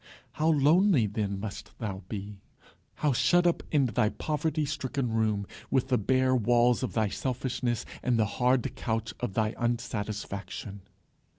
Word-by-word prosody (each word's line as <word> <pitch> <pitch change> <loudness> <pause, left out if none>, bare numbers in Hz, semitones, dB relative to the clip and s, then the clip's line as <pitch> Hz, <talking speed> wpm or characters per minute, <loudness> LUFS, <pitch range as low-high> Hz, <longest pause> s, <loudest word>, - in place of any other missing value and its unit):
How 155 - -1
lonely 160 - +4
then 100 -1 -2
must 100 0 -7
thou 100 -4 -4
be! 100 -1 -6 0.6
how 150 -3 +1
shut 175 +8 +3
up 175 - +2
in 145 -4 +4
thy 110 -3 +2
poverty 155 +3 -1
stricken 140 -4 -2
room, 110 -2 +1 0.2
with 130 0 +1
the 125 - +3
bare 130 +4 +2
walls 120 +1 +3
of 130 - -2
thy 110 -2 +2
selfishness, 125 -1 -2 0.2
and 125 -2 +1
the 110 - +3 0.2
hard 125 0 +2
couch 110 -1 -2
of 115 -6 -3
thy 110 0 +1
unsatisfaction! 105 -3 -3
120 Hz, 150 wpm, -29 LUFS, 105-135 Hz, 0.6 s, lonely